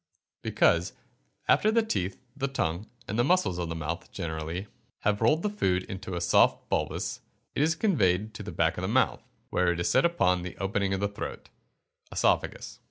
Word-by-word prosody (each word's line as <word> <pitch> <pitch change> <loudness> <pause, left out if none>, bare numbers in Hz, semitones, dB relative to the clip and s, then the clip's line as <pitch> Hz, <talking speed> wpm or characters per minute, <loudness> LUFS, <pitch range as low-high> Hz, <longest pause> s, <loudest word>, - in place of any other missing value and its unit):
_ - - -65
Because, - - +2 0.5
after 215 - +4
the 230 +1 +3
teeth, 95 - -2 0.2
the 140 -1 -1
tongue, 95 -6 -2 0.2
and 105 +4 -2
the - - +5
muscles 145 - +2
of 85 -2 -2
the 80 - -3
mouth 80 - -4
generally, 80 +3 -4 0.4
have 105 +1 +1
rolled 150 +9 +3
the - - +2
food 95 - +1
into 95 -1 -6
a 85 - -2
soft - - +3
bolus, - - -1 0.3
it - - 0
is 160 +2 +3
conveyed 110 - +2
to 110 - -7
the 105 +1 -6
back 80 +2 +1
of - - -4
the 95 - -1
mouth, 120 +2 +2 0.3
where 90 -1 +3
it 85 - -2
is 85 - +1
set 130 - +4
upon 90 - +2
the 90 -1 -7
opening 95 +1 0
of 95 - -4
the 100 - +2
throat 100 - -7 0.6
(oesophagus). - - 0
100 Hz, 195 wpm, -28 LUFS, 90-135 Hz, 0.6 s, the